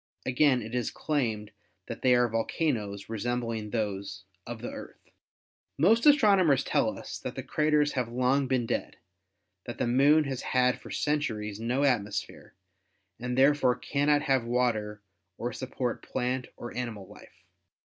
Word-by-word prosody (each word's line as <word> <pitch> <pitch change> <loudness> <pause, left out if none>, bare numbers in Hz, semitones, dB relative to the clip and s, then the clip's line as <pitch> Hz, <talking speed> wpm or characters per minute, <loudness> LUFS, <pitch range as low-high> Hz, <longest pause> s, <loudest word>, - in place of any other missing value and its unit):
Again 130 -1 +3
it 110 +2 -8
is 125 -2 -1
claimed 115 -9 -2 0.3
that 115 - -7
they 125 -1 +5
are 120 0 +3
volcanoes 110 -3 -2
resem 120 +3 -2
bling 115 -2 -4
those 100 -4 -3 0.2
of 120 -1 -7
the - - -4
Earth. - - -11 0.7
Most 225 - +4
astronomers 200 - +5
tell - - 0
us - - -7
that - - -6
the - - -5
craters 150 -1 +2
have 125 -3 -2
long 130 +3 +1
been 125 -2 +1
dead, - - -3 0.7
that 120 - -6
the - - 0
Moon 140 +6 +4
has 135 -3 -4
had 125 0 +1
for - - -11
centuries 110 -9 -2
no 120 +4 -1
atmos 115 -8 +1
phere - - -16 0.6
and 125 +1 -3
therefore 135 -2 +4
cannot 145 +3 +1
have 135 -3 +2
water 110 -4 -1 0.3
or 120 0 -3
support 130 -1 -3
plant 125 0 -2
or 120 - -8
animal 115 -5 -4
life. - - -16
125 Hz, 155 wpm, -28 LUFS, 115-140 Hz, 0.7 s, they